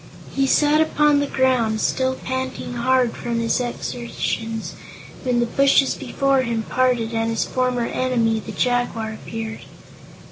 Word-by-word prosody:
He 275 0 +2
sat 295 +2 +4
upon 300 -2 +3
the 285 - 0
ground, 250 -5 +1
still 260 +3 0
panting 260 -1 -4
hard 250 0 +2
from 235 -1 -3
his 230 +1 +1
exertions, 235 -2 -4 0.5
when 250 -2 0
the 240 - +2
bushes 275 +2 +3
before 275 -1 +1
him 230 -3 -2
parted 245 -2 +1
and 225 0 0
his 225 - 0
former 250 -2 0
enemy, 235 -3 0
the - - -8
Jaguar, 245 -3 -1
appeared. 225 0 -6
245 Hz, 140 wpm, -22 LUFS, 230-260 Hz, 0.5 s, sat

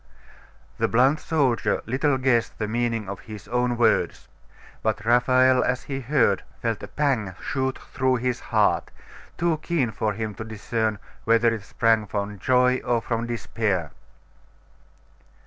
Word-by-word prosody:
The - - +2
blunt 130 +6 +3
soldier 140 -8 0
little 135 +4 +1
guessed 125 -3 +1
the 105 - -2
meaning 115 -1 -1
of 100 0 -5
his 105 -3 -10
own 125 0 0
words. 115 -2 +1 0.5
But 110 -1 -1
Raphael, 130 +2 +4
as 130 0 -1
he 135 -1 -4
heard, 130 -6 +2 0.2
felt 115 -3 -2
a - - -7
pang 125 -11 -1
shoot 130 -1 -2
through 130 -1 -1
his 125 0 -1
heart, - - +1 0.5
too 170 -3 +1
keen 150 -10 0
for 110 0 -1
him 110 0 -4
to - - -2
discern 110 0 -2 0.3
whether 115 0 +3
it 115 - -4
sprang 110 +1 +1
from 100 +1 -4
joy 125 +1 +3
or 120 -2 +1
from 115 +1 -3
despair. 105 -8 -2
120 Hz, 145 wpm, -24 LUFS, 110-130 Hz, 0.5 s, Raphael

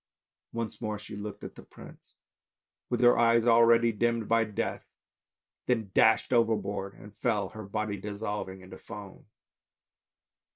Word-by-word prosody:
Once 115 0 -5
more 105 -2 -2
she 105 0 -10
looked 105 0 -7
at - - -7
the - - -12
prince, - - -15 0.7
with - - -1
her 120 -1 +6
eyes 115 0 +4
already 115 0 +5
dimmed 115 0 0
by 115 0 +3
death, 105 -2 -4 0.8
then 115 -6 0
dashed 110 +3 +4
overboard 105 -4 0
and 105 0 -14
fell, 105 -3 0
her 110 -2 -9
body 105 0 -3
dissolving 105 -1 -5
into 95 0 -12
foam. 105 -5 -11
110 Hz, 135 wpm, -29 LUFS, 100-115 Hz, 0.8 s, her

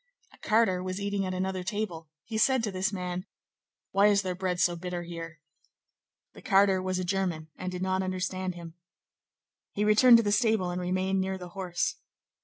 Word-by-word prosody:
A - - -19
carter 210 -5 +2
was 185 +1 -4
eating 200 -1 -1
at 185 - -3
another 190 0 -2
table; 180 -5 -4 0.2
he 225 - -6
said 255 +2 +3
to 210 - -1
this 190 +2 -1
man:— 180 -1 -4 0.6
"Why 200 +1 +5
is 200 -1 +3
their 185 -1 -2
bread 180 -1 -2
so 175 -1 +3
bitter 175 0 -5
here?" 165 -2 -8 0.9
The - - -13
carter 195 -1 +4
was 185 0 -2
a 185 - -1
German 175 -4 -2
and 185 0 -5
did 180 0 -4
not 190 0 0
understand 185 0 -3
him. 170 -1 -9 1.0
He 210 - 0
returned 230 +3 +7
to 230 - +2
the 205 - 0
stable 220 -5 +2
and 180 +1 -3
remained 185 +1 0
near 190 0 -2
the 180 -1 -9
horse. 180 -1 -2
185 Hz, 190 wpm, -28 LUFS, 180-200 Hz, 1.0 s, returned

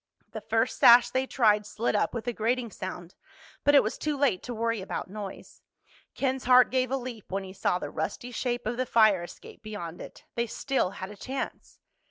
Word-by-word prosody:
The - - -6
first - - 0
sash 240 0 +8
they 260 +1 0
tried 210 -6 +3
slid 220 +2 -2
up - - +1
with 225 -2 -4
a 240 - -1
grating 235 +1 -1
sound, 180 -2 -7 0.5
but 290 - +5
it 280 - +7
was 215 - -3
too 300 -1 -1
late 270 -10 +2
to 245 - -7
worry 230 -1 -1
about 190 0 -5
noise. 205 -2 -8 0.5
Ken's 265 -1 -1
heart 250 0 +6
gave 255 -1 +1
a 270 - 0
leap 245 -6 -8
when 195 +1 -2
he 190 0 -9
saw 185 -2 0
the - - -6
rusty 160 +10 -4
shape 245 0 -2
of 240 +2 -2
the 255 0 -1
fire 215 -6 +4
escape 175 - -11
beyond 205 -6 -7
it. - - -11
They 235 0 -1
still 265 -3 -1
had 190 +2 -6
a - - -10
chance! 265 +6 -6
230 Hz, 210 wpm, -28 LUFS, 200-255 Hz, 0.5 s, sash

